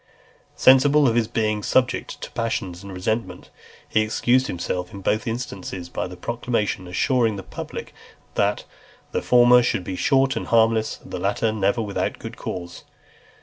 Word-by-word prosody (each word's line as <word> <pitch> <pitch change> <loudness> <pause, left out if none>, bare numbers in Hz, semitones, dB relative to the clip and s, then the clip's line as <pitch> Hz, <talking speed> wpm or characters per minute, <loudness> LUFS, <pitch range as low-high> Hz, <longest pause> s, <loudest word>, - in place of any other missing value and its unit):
XXXVIII. - - -32
Sensible 140 +2 +6
of 115 - +2
his 115 -2 +2
being 110 -2 0
subject 125 +4 0
to - - -7
passion 115 -5 -2
and 100 - -9
resentment, 95 0 -3 0.4
he 110 - +2
excused 120 +4 +2
himself 90 +1 -3
in 100 - -8
both 105 +4 0
instances 95 -6 -5
by 90 - -3
a 90 0 -8
proclamation, 115 -4 -2
assuring 115 +4 +1
the 95 - -7
public 95 - -7 0.4
that 100 +1 +1 0.5
"the - - -1
former 125 0 +6
should 120 -6 0
be 90 - -5
short 135 +5 +2
and - - -4
harmless, 115 -1 +2
and - - -13
the 90 - -4
latter 100 +4 0
never 110 +2 0
without 100 -2 -2
good - - -8
cause." 85 -1 -6
110 Hz, 165 wpm, -23 LUFS, 95-120 Hz, 0.5 s, Sensible